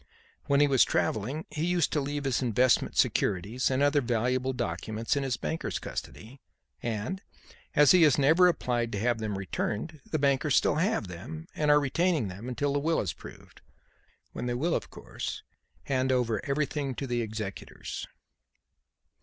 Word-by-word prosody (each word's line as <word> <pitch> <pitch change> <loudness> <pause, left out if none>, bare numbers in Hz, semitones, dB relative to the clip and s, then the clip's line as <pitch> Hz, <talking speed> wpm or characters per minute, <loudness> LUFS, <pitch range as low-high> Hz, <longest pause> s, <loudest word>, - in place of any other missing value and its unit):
When 140 -1 +3
he 145 - +6
was 135 -3 +5
travelling 125 +9 -1
he 155 - -3
used 175 0 +1
to 150 - +1
leave 145 +1 -3
his 135 -2 0
investment 125 0 +2
securities 100 +7 +1
and 135 +1 +1
other 145 0 +3
valuable 125 +2 0
documents 115 -2 -2
in 140 - 0
his 130 -4 -1
bankers' 160 +7 -3
custody, 125 +5 -7 0.4
and, 115 - -3 0.5
as 145 -2 +7
he 185 - +6
has 150 -5 +6
never 160 +6 +5
applied 120 -8 0
to 100 - -2
have 120 +1 +1
them 105 -3 -3
returned, 105 - -3
the 155 - 0
bankers 140 0 +2
still 150 - +3
have 165 - 0
them 125 - -8
and 150 -1 0
are 150 0 +7
retaining 150 - +1
them 100 +7 -7
until 140 +3 -1
the 145 - +1
will 160 +3 +1
is 90 - -2
proved, - - -13 0.7
when 125 - -4
they 120 - -1
will, 165 +7 0
of - - -2
course, - - -6 0.4
hand 130 -1 0
over 120 -5 +1
everything 140 -1 -1
to 140 - -4
the 120 -2 -1
executors." 110 -3 -6
130 Hz, 170 wpm, -29 LUFS, 115-150 Hz, 0.7 s, as